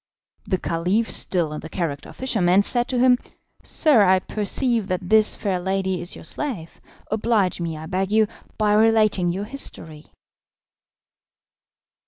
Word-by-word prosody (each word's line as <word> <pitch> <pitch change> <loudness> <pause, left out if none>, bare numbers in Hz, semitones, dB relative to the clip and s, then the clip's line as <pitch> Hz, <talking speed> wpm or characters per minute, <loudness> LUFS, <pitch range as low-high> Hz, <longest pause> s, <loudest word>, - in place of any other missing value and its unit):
The 185 - 0
Caliph 180 +7 -1
(still 170 -5 -1
in 150 - -5
the 160 - -9
character 160 -6 -4
of - - -13
fisherman) 200 -7 +2
said 240 +3 0
to 255 - -2
him, 250 0 +4 0.4
"Sir, 295 -9 +3
I 190 -1 +5
perceive 215 +3 0
that 180 -1 -3
this 220 -1 +5
fair 190 -3 -2
lady 190 -1 -1
is 175 - -5
your - - -11
slave. 215 - -6 0.3
Oblige 215 -4 +1
me, 165 -2 -3
I 155 - -8
beg 190 +4 -2
you, 220 0 +4 0.3
by 210 -1 +2
relating 215 -4 +3
your 195 +4 -4
history." 160 - -6
195 Hz, 150 wpm, -22 LUFS, 175-220 Hz, 0.4 s, I